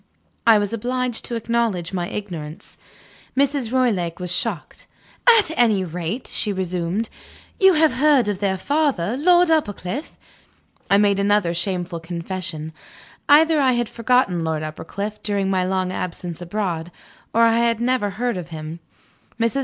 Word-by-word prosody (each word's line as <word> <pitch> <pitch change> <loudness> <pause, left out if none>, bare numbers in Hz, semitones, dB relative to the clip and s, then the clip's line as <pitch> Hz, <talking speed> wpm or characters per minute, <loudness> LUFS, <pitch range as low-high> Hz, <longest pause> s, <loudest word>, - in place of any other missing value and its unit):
I 225 -2 +8
was 205 +1 -1
obliged 245 +1 -2
to 240 - -3
acknowledge 225 -6 -1
my 175 -2 -2
ignorance. 170 -7 -7 0.6
Mrs. 275 -4 +1
Roylake 205 -11 0
was 180 -1 -4
shocked. - - -3 0.5
"At 410 -7 +2
any 220 -6 +3
rate," 180 +7 -4
she 210 - -1
resumed, 185 +2 -2 0.5
"you 385 -1 +6
have 315 -1 +3
heard 280 -4 +3
of 205 -2 -2
their 195 -2 0
father, 270 - 0
Lord 350 +4 +4
Uppercliff?" 275 - -2 0.7
I 200 - +5
made 200 -1 +3
another 200 -3 +2
shameful 175 -1 -2
confession. 170 -1 -5 0.6
Either 315 +2 +6
I 260 -2 +3
had 240 -1 0
forgotten 230 -7 +1
Lord 160 -1 -2
Uppercliff, 200 +7 -6
during 200 -2 -1
my 185 -1 +1
long 185 0 -1
absence 175 -2 -5
abroad, 175 -2 -3 0.4
or 230 - +3
I 230 0 +4
had 235 -1 +2
never 245 -3 +1
heard 235 +2 -2
of 175 -2 -6
him. 160 0 -7 0.6
Mrs. 230 +4 +1
205 Hz, 145 wpm, -22 LUFS, 175-245 Hz, 0.7 s, I